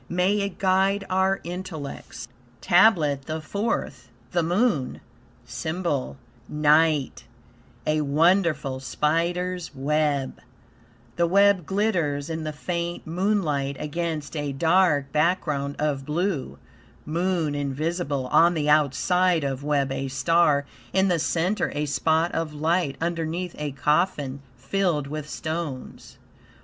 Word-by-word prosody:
May 185 +4 +2
it 200 -2 -3
guide 195 +1 +2
our 190 +1 +2
intellects." 170 -8 -7 0.3
TABLET 160 -8 +3
THE 160 0 -3
FOURTH 155 - -3 0.2
The 175 - +1
Moon 175 - 0 0.5
SYMBOL 160 -6 -3 0.3
NIGHT 150 -1 +2 0.6
A 155 0 +1
wonderful 150 -2 +2
spider's 170 +5 -1
web; 145 -1 0 0.8
The 170 0 +3
web 200 -2 +4
glitters 170 -8 0
in 160 -1 -4
the 155 - -2
faint 170 +3 -4
moonlight 160 -6 0
against 155 0 -3
a 145 -2 -2
dark 160 -2 +2
background 150 -3 0
of 145 -2 -1
blue; 160 +1 -2 0.5
moon 170 -1 0
invisible; 145 0 -2
on 170 +1 +5
the 150 -2 -1
outside 165 +4 +3
of 135 0 -3
web 140 -2 0
a 135 0 -2
star, 145 +2 +2 0.3
in 190 0 +3
the 175 -2 +2
center 180 +6 0
a 150 +1 0
spot 160 +3 +1
of 155 -2 -3
light, 160 -1 0
underneath 170 +1 -2
a 150 -1 -3
coffin 145 -1 0 0.2
filled 155 +2 0
with 150 +1 -6
stones. 155 -5 -5
160 Hz, 115 wpm, -25 LUFS, 145-180 Hz, 0.8 s, on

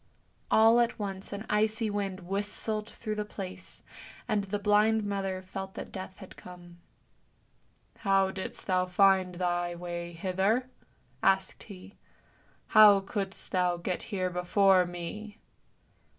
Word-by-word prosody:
All 225 +2 +6
at 240 0 +1
once 195 -3 -5
an 205 +2 -6
icy 220 +2 +1
wind 200 -2 -3
whistled 205 +3 -2
through 215 -2 -5
the 210 0 -2
place, 185 -3 -9 0.4
and 210 -4 0
the 205 +1 -2
blind 210 +2 +3
mother 195 -2 -3
felt 190 +1 -7
that - - -7
Death 190 0 -8
had 190 - -12
come. 175 -1 -13 0.6
" - - -39 0.5
How 195 -2 +2
didst 190 0 -6
thou 185 -1 +1
find 185 -1 +3
thy 175 -1 -1
way 175 0 -6
hither? 195 +9 0 0.2
" - - -39 0.2
asked 190 -1 +1
he. 195 -1 -12 0.3
" - - -35
How 210 -2 +8
couldst 195 0 -4
thou 180 -1 +1
get 175 +1 -3
here 185 -4 -1
before 180 +1 +3
me? 205 +5 -7
195 Hz, 140 wpm, -29 LUFS, 185-210 Hz, 0.6 s, How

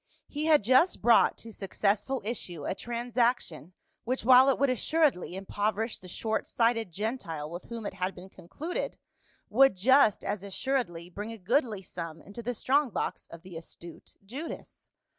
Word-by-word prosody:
He 300 +1 -3
had 310 -7 +5
just 260 - +4
brought 230 0 +5
to 225 -1 -10
successful 210 +5 -1
issue 175 -9 -4
a - - -1
transaction 235 - -1 0.3
which, 255 0 -2
while 260 +2 +8
it 270 - +2
would 275 -1 +2
assuredly 265 - +1
impoverish 205 +3 -2
the 185 - -12
short 220 +4 -2
sighted 230 -4 +1
Gentile 170 - -4
with 175 +1 -7
whom 230 -2 -7
it - - -4
had 185 0 -3
been 185 +1 -12
concluded, 315 - -5 0.5
would 270 +1 +5
just 240 +2 +4
as 200 -1 -2
assur 255 +7 0
edly 175 -2 -11
bring 210 +4 -5
a 225 - -7
goodly 220 - 0
sum 165 -3 -7
into 200 +7 -9
the 245 +1 -3
strong 280 +4 +2
box - - -3
of 170 0 -11
the 185 -2 -11
astute 165 0 -11
Judas. 275 +11 -8
220 Hz, 165 wpm, -29 LUFS, 185-255 Hz, 0.5 s, while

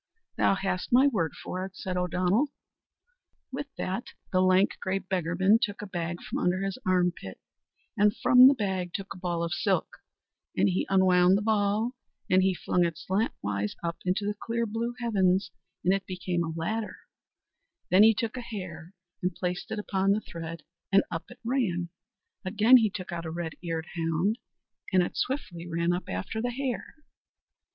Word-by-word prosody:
"Thou - - +3
hast 190 -2 -2
my 255 +3 +6
word 195 - +1
for 185 0 -4
it," 190 0 -7
said 185 -1 -4
O'Donnell. 180 - +1 1.0
With 280 +2 -4
that 190 +6 -3 0.3
the 185 -2 +3
lank, 185 +1 +4
grey 190 +1 0
beggarman 190 +2 +2
took 205 0 -2
a - - -4
bag 175 -2 -4
from - - -3
under 180 +1 +1
his 195 -1 -3
arm 180 -1 +3
pit, 95 - -10 0.6
and 210 +1 +4
from 250 0 +5
out 255 - +12
the 275 - +7
bag 190 -6 -2
a 195 -2 -8
ball 175 -2 -2
of 170 0 -2
silk, 140 - 0 0.6
and 100 +1 +4
he 95 +1 0
unwound 185 -1 +5
the 210 - -2
ball 215 +1 +1 0.4
and 185 0 +6
he 190 0 +2
flung 180 0 +1
it 165 -2 -1
slant 195 +7 -1
wise 100 0 -2
up 170 0 -2
into 185 +3 0
the 205 - 0
clear 230 +2 -2
blue 230 +2 -3
heavens, 190 -5 +2 0.3
and 185 - +5
it 195 -1 -2
became 180 -2 -2
a 165 - -3
ladder; 190 +7 -3 0.9
then 185 +2 +7
he 220 +1 +7
took 230 +2 -2
a 255 - -4
hare 185 -6 -8 0.3
and 180 -1 -1
placed 180 -1 -3
it 220 - -3
upon 195 -1 +1
the 215 - -1
thread, 165 -3 -7 0.3
and 195 0 +6
up 165 -1 -4
it - - -12
ran; 215 -9 0 0.5
again 215 +6 +6
he 220 -3 +3
took 185 -3 -7
out 170 -1 -4
a - - -3
red 165 -1 -4
eared 165 -2 -3
hound, 170 - 0 0.5
and 185 -2 +5
it - - -4
swiftly 175 - -3
ran 170 +1 0
up 180 - -4
after 95 - -3
the 245 - -1
hare. 255 +2 -4
185 Hz, 180 wpm, -28 LUFS, 175-210 Hz, 1.0 s, out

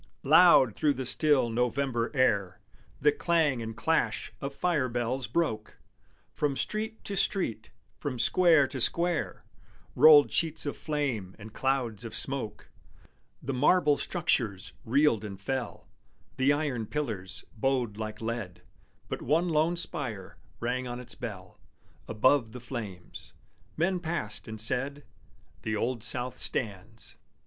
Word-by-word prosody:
Loud 150 - +6
through 150 -2 +1
the 130 - -4
still 140 -3 +3
November 125 0 0
air 100 -8 +1 0.4
The 150 +2 +4
clang 150 -5 +1
and 115 -1 -6
clash 115 -9 0
of 140 - -3
fire 155 -8 0
bells 120 +1 -2
broke; 110 -5 -2 0.6
From 145 -2 -1
street 220 +1 -3
to 200 - -5
street, 115 - -1 0.3
from 140 -4 -4
square 160 +4 +4
to 130 - -5
square, 170 +5 -1 0.5
Rolled 150 -2 +8
sheets 160 -2 +1
of 145 - -3
flame 135 - -3
and 110 0 -11
clouds 125 -5 -1
of 115 - -7
smoke. 120 -6 -4 0.7
The 135 - -3
marble 150 +3 +4
structures 105 - -1
reeled 130 -2 +3
and 100 -2 -7
fell, 130 +4 -4 0.5
The 130 +2 +3
iron 145 -7 -1
pillars 105 -11 -5
bowed 125 -2 0
like 110 0 -5
lead; 110 -6 -5 0.4
But - - -5
one 170 +4 +1
lone 160 +2 +2
spire 120 - -2 0.2
rang 125 +2 -2
on 120 0 -5
its 125 -1 -5
bell 100 -8 -8 0.5
Above 115 +1 +2
the 125 - -7
flames. 110 -8 -8 0.4
Men 180 +3 +1
passed, 160 -11 -4
and 110 -1 -7
said, 135 +6 0 0.6
"The 110 -1 -2
Old 115 +1 -2
South 120 +2 -3
stands!" 105 0 -4
125 Hz, 135 wpm, -29 LUFS, 110-150 Hz, 0.7 s, Rolled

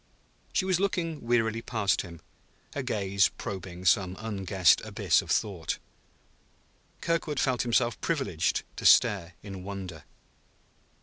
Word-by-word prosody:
She 185 - +1
was 185 -2 +2
looking 170 -6 -1
wearily 115 -1 +1
past 100 -9 0
him, 85 -2 -11 0.5
her 140 - -2
gaze 100 -6 +2
probing 95 -2 -6
some 95 0 +3
unguessed 95 -5 +2
abyss - - +1
of - - -12
thought. 95 -7 -1 1.2
Kirkwood 165 -4 -1
felt 130 -3 +1
himself 120 -2 +1
privileged - - 0
to - - -6
stare 90 -3 +5
in 95 -3 -8
wonder. 95 -6 -7
100 Hz, 120 wpm, -28 LUFS, 95-120 Hz, 1.2 s, stare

